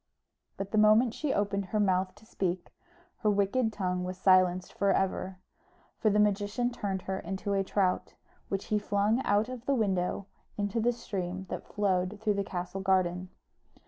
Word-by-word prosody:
But 195 Hz, 0 st, -5 dB
the 215 Hz, -, +3 dB
moment 215 Hz, +3 st, +5 dB
she 300 Hz, -3 st, -2 dB
opened 200 Hz, -2 st, 0 dB
her 210 Hz, +3 st, -1 dB
mouth 185 Hz, -2 st, +1 dB
to 210 Hz, +1 st, -19 dB
speak, 185 Hz, -5 st, -3 dB, 0.4 s
her 215 Hz, -, +1 dB
wicked 205 Hz, +4 st, +2 dB
tongue 180 Hz, -3 st, -2 dB
was 180 Hz, 0 st, -4 dB
silenced 185 Hz, -1 st, +3 dB
for 200 Hz, 0 st, +2 dB
ever; 190 Hz, 0 st, -1 dB, 0.6 s
for 220 Hz, -, +3 dB
the 210 Hz, -, +2 dB
magician 210 Hz, +4 st, +1 dB
turned 195 Hz, -5 st, -3 dB
her 190 Hz, 0 st, -3 dB
into 195 Hz, +3 st, -3 dB
a 195 Hz, -1 st, +2 dB
trout, 190 Hz, -1 st, 0 dB, 0.3 s
which 195 Hz, 0 st, -2 dB
he 210 Hz, -, +4 dB
flung 205 Hz, +4 st, +1 dB
out 205 Hz, +2 st, +3 dB
of 255 Hz, -1 st, -8 dB
the 275 Hz, -, +3 dB
window 195 Hz, -4 st, 0 dB, 0.3 s
into 205 Hz, +2 st, -1 dB
the 235 Hz, +2 st, +3 dB
stream 190 Hz, -6 st, -4 dB
that -, -, -5 dB
flowed 195 Hz, 0 st, 0 dB
through 215 Hz, -1 st, +1 dB
the 200 Hz, 0 st, -1 dB
castle 180 Hz, +1 st, -4 dB
garden. 185 Hz, -1 st, +1 dB
200 Hz, 175 wpm, -30 LUFS, 185-210 Hz, 0.6 s, moment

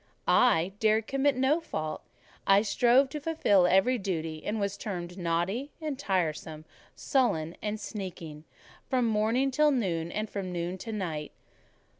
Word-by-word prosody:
I 190 Hz, -7 st, +4 dB
dared 220 Hz, 0 st, +3 dB
commit 275 Hz, +1 st, +1 dB
no 265 Hz, +5 st, +2 dB
fault: 155 Hz, -, -4 dB, 0.5 s
I 195 Hz, +1 st, +6 dB
strove 245 Hz, +5 st, +4 dB
to 300 Hz, -, -5 dB
fulfil 245 Hz, -, +3 dB
every 195 Hz, +8 st, +3 dB
duty; 165 Hz, -5 st, -3 dB
and 215 Hz, -, -2 dB
I -, -, -3 dB
was 200 Hz, -1 st, -1 dB
termed 180 Hz, -4 st, -5 dB
naughty 180 Hz, -, -1 dB
and 300 Hz, -4 st, -4 dB
tiresome, 160 Hz, -, -2 dB, 0.3 s
sullen 170 Hz, -, 0 dB
and 215 Hz, 0 st, -3 dB
sneaking, 170 Hz, -8 st, -7 dB, 0.4 s
from 255 Hz, -2 st, +2 dB
morning 225 Hz, +5 st, +1 dB
to 300 Hz, +3 st, +4 dB
noon, 175 Hz, -, -1 dB
and 215 Hz, +1 st, -2 dB
from 195 Hz, -3 st, -5 dB
noon 175 Hz, +1 st, -3 dB
to 225 Hz, -, -6 dB
night. 165 Hz, -8 st, -4 dB
200 Hz, 150 wpm, -29 LUFS, 175-250 Hz, 0.5 s, I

